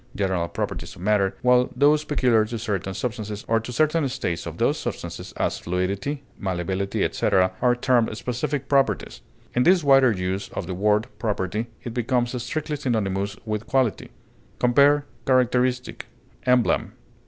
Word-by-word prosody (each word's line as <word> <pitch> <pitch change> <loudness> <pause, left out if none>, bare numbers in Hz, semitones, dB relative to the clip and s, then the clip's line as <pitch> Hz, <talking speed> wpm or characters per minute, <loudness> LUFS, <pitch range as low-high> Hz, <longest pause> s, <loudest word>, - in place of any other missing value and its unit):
general 95 -4 0
properties 85 - -5
of - - -13
matter, 100 -2 +2
while 125 0 +4
those 145 +3 +4
peculiar 125 -7 +2
to 115 +2 -4
certain 100 -4 -3
substances 105 0 -4
or 115 0 +3
to 115 +2 -7
certain 155 +1 +2
states 125 -10 -3
of - - -7
those - - +1
substances - - -6
(as - - -1
fluidity, 100 - -2 0.2
malleability, 95 +1 -2
etc.) 95 -2 +2
are 125 -1 +4
termed 120 -3 +1
specific 135 +3 -3
properties; 135 -1 +1 0.3
in 125 - +2
this 175 +4 +4
wider 135 -3 +6
use 95 -1 -3
of 95 - -4
the 90 - -4
word 105 +3 +2
property, 105 0 -2 0.2
it 120 - -5
becomes 120 +1 0
strictly 150 +4 -3
synonymous 100 -6 -1
with 105 0 -3
quality. 130 -5 0 0.5
Compare 140 +4 +4 0.2
CHARACTERISTIC; 125 -1 +1 0.4
EMBLEM. 125 -1 +2
120 Hz, 145 wpm, -24 LUFS, 100-130 Hz, 0.5 s, wider